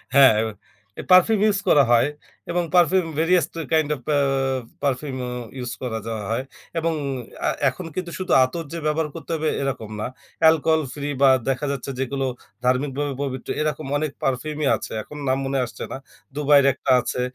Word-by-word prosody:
হ্যাঁ, 135 -5 +8 0.7
এ - - -2
perfume 190 +4 +6
use 205 -2 +2
করা 145 -2 +6
হয় 120 +3 +5 0.4
এবং 175 0 +1
perfume 180 +1 +4
various 175 +2 +3 0.3
kind 155 -2 +3
of 130 - -13
uh 145 - +3 0.6
perfume 135 0 -1
O - - -4 0.3
use 125 -2 -4
করে 115 -3 -3
যাওয়া 110 -2 -3
হয়। 115 +3 0 0.4
এবং 165 0 0 0.5
আ - - +3 0.2
এখন 165 +8 -8
কিন্তু 180 -2 -3
শুধু 185 - -3
আতর 145 +7 -2
যে - - -3
ব্যবহার 155 +1 +1
করতে 165 0 -7
হবে, 155 0 0
এরকম 135 -6 -3
না। - - -2 0.3
অ্যালকোহল 160 0 +4
ফ্রি 145 0 -4
বা 135 - +7 0.2
দেখা 135 +2 -1
যাচ্ছে 140 0 -4
যেগুলো 135 +1 -1 0.4
ধার্মিক 130 +3 +2
ভাবে 145 -1 -1
পবিত্র, 130 -2 -5
এরকম 155 -1 -2
অনেক 155 -1 -2
পারফিউমই 150 +3 -1
আছে। - - -7
এখন 150 - -11
নাম 130 0 +2
মনে 135 0 0
আসছে 115 - -8
না। - - -4 0.4
দুবাই 145 -1 +5
এর - - 0
একটা 130 - -2
আছে। 125 - -3
145 Hz, 180 wpm, -23 LUFS, 130-160 Hz, 0.7 s, হ্যাঁ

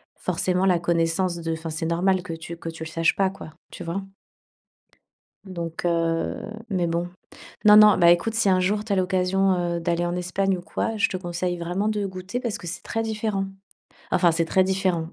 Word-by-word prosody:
forcément 185 0 0
la 180 -3 +3
connaissance 170 +1 +1
de 165 -1 -3
enfin 165 0 -5
c'est 160 +2 -3
normal 185 +3 +2
que 175 -3 -6
tu 165 +1 -8
que 165 - -6
tu 165 0 -7
le 160 - -6
saches 165 0 +1
pas, 195 -1 +2
quoi, 190 -4 -10 0.2
tu - - -8
vois? 175 +4 -3 1.4
Donc 170 -4 -5
heu, 165 -1 0 0.3
mais 180 -4 0
bon, 170 +1 -1 0.5
non, 210 0 +8
non, 210 -1 +8
bah, 170 -1 +6
écoute, 175 +6 +2
si 220 -3 +2
un 185 -1 +4
jour 205 +3 0
tu 220 - -6
as - - +3
l'occasion, 185 +1 +2 0.2
heu, - - -3
d'aller 170 +1 0
en 175 0 -2
Espagne 185 +2 0
ou - - -8
quoi, 220 +5 -3
je 205 - +3
te - - -5
conseille 175 0 -3
vraiment 175 +4 -2
de 210 -2 -1
goûter 190 +5 -5
parce 235 -4 -2
que 175 - -10
c'est 175 +1 -6
très 225 - -2
différent. 215 -3 -2 0.7
Enfin, 175 -2 +4
c'est 165 +1 +1
très 185 +3 +3
différent. 185 -4 0
180 Hz, 205 wpm, -24 LUFS, 170-195 Hz, 1.4 s, non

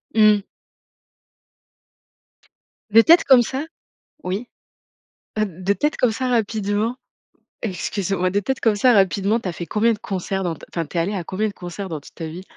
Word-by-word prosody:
Mmh. 215 -2 +5 2.5
De 225 +2 +7
tête 335 +7 +6
comme 260 -3 +7
ça, 265 +5 -3 0.6
oui, 195 +7 -3 0.9
heu, 215 - +3
de 185 +2 -2
tête 295 +6 0
comme 240 -3 +2
ça 255 +2 -2
rapidement. 220 0 0 0.7
Excuse-moi, 190 -2 -1
de 200 - +1
tête 265 +6 -2
comme 225 -2 +2
ça 245 +4 +4
rapidement 200 +2 +2
tu 210 - -6
as - - -2
fait 170 - -6
combien 225 +4 +2
de 210 - -7
concerts, 195 0 -3
dans 170 -2 -2
ta - - -13
v - - -37
enfin 165 -2 -2
tu 170 - -7
es - - +3
allée 190 +5 0
à 180 - -3
combien 200 +5 -2
de 205 - -6
concerts 185 +2 -7
dans 160 -3 -4
toute - - -16
ta 165 - -5
vie? 175 +4 -8
205 Hz, 185 wpm, -21 LUFS, 185-225 Hz, 2.5 s, De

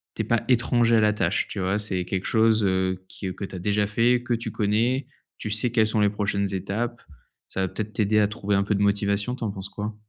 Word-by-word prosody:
tu - - -2
es - - -6
pas 115 -1 +1
étranger 120 -1 +3
à - - +4
la 105 0 +4
tâche, 95 -3 0
tu 100 - -5
vois? 95 +2 0
C'est 95 -4 -2
quelque 95 +1 -3
chose, 110 -1 +3
heu, 95 -1 0
qui 95 -2 -5
que - - -7
tu - - -12
as 90 - -5
déjà 105 +2 +1
fait, 120 +3 +2
que 120 - -1
tu 115 0 -3
connais. 115 +5 +1 0.3
Tu 110 - -4
sais 110 +4 +1
quelles 115 -2 +3
sont 110 0 0
les 105 - +4
prochaines 100 -1 -1
étapes. 110 +6 -3 0.5
Ça - - -6
va - - +1
peut-être 110 +2 -5
t'aider 105 0 +1
à 105 - +4
trouver 105 -1 -2
un 100 - +3
peu 105 +1 0
de 100 - -1
motivation. 100 +3 +1
Tu - - -7
en 110 - -1
penses 95 0 -6
quoi? 105 +1 -5
105 Hz, 255 wpm, -25 LUFS, 100-115 Hz, 0.5 s, à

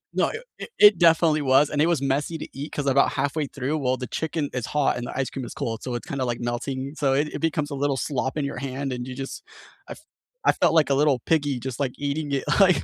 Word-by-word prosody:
No, - - +3
it 450 - -6 0.2
it - - -7
it 210 -2 +8
definitely 165 -2 +4
was, 135 +1 +4
and 145 - +1
it 160 - +4
was 170 -5 +1
messy 140 +4 -1
to - - -7
eat 140 +3 -6
'cause 145 - -3
about 140 0 +3
halfway 145 +1 -1
through, 140 +3 -2
well, 130 -2 0
the 125 - -5
chicken 160 -2 -2
is 125 -4 -3
hot 150 -2 +1
and 120 0 -4
the - - -6
ice 135 -1 -1
cream 135 - -5
is - - -8
cold, 115 -1 -3
so 125 -2 -4
it's 120 - -6
kinda, 140 -1 -2
like, 120 -1 -2
melting. 130 +3 -3
So 140 -4 +1
it 145 +3 +1
it - - -4
becomes 155 -2 -1
a - - -3
little 140 0 0
slop 130 0 -2
in 145 - 0
your 140 - -4
hand, 135 +1 -3
and 125 0 -5
you 130 - -6
just 135 +1 -6 0.4
I - - -6
f - - -15 0.5
I - - +7
felt 170 -3 +2
like 155 -4 +4
a - - +5
little 140 -1 +3
piggy 145 -4 +1
just, 130 0 -6
like, 135 -3 -1
eating 145 +1 -2
it, 135 - 0 0.2
like, 185 -3 +5
140 Hz, 270 wpm, -24 LUFS, 130-150 Hz, 0.5 s, it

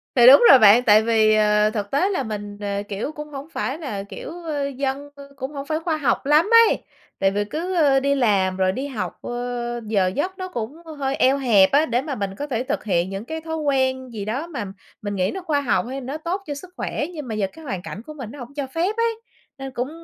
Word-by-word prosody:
Thì 240 -2 +7
đúng 270 0 +9
rồi 265 - +9
bạn, 220 +2 +7
tại 215 -2 +6
vì, 220 -1 +4
ờ, 210 0 +3
thực 205 -2 -4
tế 345 +8 +2
là 390 - -1
mình, 205 -1 -6
ờ, 200 0 -2
kiểu, 205 +8 -3
cũng 300 -1 -8
hổng 280 0 -8
phải 270 -2 -3
là, 220 -12 -5
kiểu, 200 - -9
ơ, 295 -4 -2
dân, 275 +1 -3
ơ, 280 0 -12
cũng 270 0 -5
hổng 280 -1 -6
phải 310 +2 -1
khoa 325 -1 -1
học 280 -3 0
lắm 300 +7 +4 0.2
ấy. - - -2 0.4
Tại 195 - +3
vì 205 +1 -1
cứ, 340 - -4
ơ, 285 -5 +4
đi 280 +1 +1
làm 195 -7 +2
rồi 185 0 +2
đi 265 +8 -4
học, 250 -7 -5
ơ, 240 0 -4
giờ 200 -4 +2
giấc 360 - -2
nó 370 -1 -4
cũng 245 -3 -5 0.2
hơi 275 -1 -1
eo 265 +1 +3
hẹp 220 -8 +4
á, 290 +3 +4
để 240 -3 0
mà 280 -1 -4
mình 200 -3 -4
có 290 +8 -5
thể 250 -4 -2
thực 260 - -3
hiện 180 -3 0
những 195 +3 -6
cái 320 +4 -5
thói 320 0 -4
quen 260 -3 0
gì 205 -3 -5
đó 260 +10 -3
mà 270 -11 -5 0.4
mình 205 -1 -4
nghĩ 185 0 0
nó 380 - -5
khoa 305 -5 0
học, 270 - +1
hay 270 +1 -5
nó 270 +4 -5
tốt 340 +5 -3
cho 290 - -3
sức 360 +6 -10
khỏe, - - -2
nhưng 300 -5 -7
mà 220 - -4
giờ 205 -2 0
cái 320 -1 -13
hoàn 190 -9 -4
cảnh 200 - -7
của 305 - -9
mình 255 -7 -8
nó 290 - -11
hổng 245 +2 -9
cho 285 -2 -3
phép 345 +10 -1
ấy, 460 -1 0 0.4
nên 270 -1 -6
cũng 250 +1 -3
265 Hz, 260 wpm, -22 LUFS, 215-295 Hz, 0.4 s, đúng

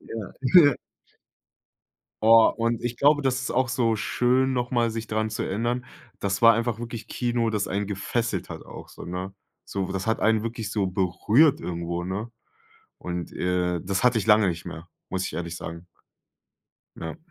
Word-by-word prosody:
Ja. 110 -5 -7 0.3
Ja. 145 -3 +5 1.5
Boah, 115 +1 +6
und 115 0 0
ich 120 0 -3
glaube, 145 +3 +4
das 135 -1 0
ist 130 - -3
auch 130 +1 +2
so 115 -3 +1
schön, 130 +4 +1
nochmal 120 -2 0
sich 115 0 -5
daran 110 0 -1
zu 110 - -3
erinnern. 120 +5 -1 0.4
Das 100 +1 -1
war 115 0 +8
einfach 115 0 -1
wirklich 115 -1 -7
Kino, 120 -2 0
das 105 -2 -1
einen 100 +2 -1
gefesselt 115 +4 -2
hat - - -8
auch - - -10
so, - - -11
ne? 90 +2 -5 0.3
So, 95 -1 -3
das 95 +2 -3
hat 110 - 0
einen 110 -1 +3
wirklich 115 -2 -4
so 100 -3 0
berührt 100 - +3
irgendwo, 85 0 -4
ne? 105 +5 -4 0.7
Und, 90 -1 -5
äh, 90 -1 0
das 95 +5 -1
hatte 125 -2 +4
ich 105 - -3
lange 105 -2 +5
nicht 85 -2 -2
mehr, 80 +2 -8 0.2
muss 95 0 -2
ich - - -6
ehrlich 85 -1 -4
sagen. 85 +1 -8 1.1
Ja. 80 -1 -6
110 Hz, 175 wpm, -25 LUFS, 95-120 Hz, 1.5 s, war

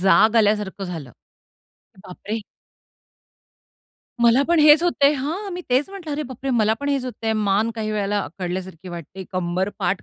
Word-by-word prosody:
जाग 215 +4 +5
आल्यासारखं 210 -2 +1
झालं. 160 -8 -6 0.9
बापरे! 210 +4 -5 1.8
मला 235 +3 +5
पण 340 -1 +4
हेच 300 +1 +7
होतंय. 295 -5 +3
हां, 320 +9 -3
मी 355 - -4
तेच 265 +7 +2
म्हंटलं, 380 -6 -8
अरे 300 +1 -2
बापरे! 260 +1 -5
मला 220 -3 +3
पण 285 - -2
हेच 275 -2 0
होतय, 225 -3 -3
मान 215 +1 +1
काही 220 -1 -3
वेळेला 205 -1 0
अखडल्यासारखी 180 +1 -6
वाटते. 175 +2 -8
कंबर, 185 +1 -1
पाठ 185 0 -1
215 Hz, 150 wpm, -22 LUFS, 190-275 Hz, 1.8 s, हेच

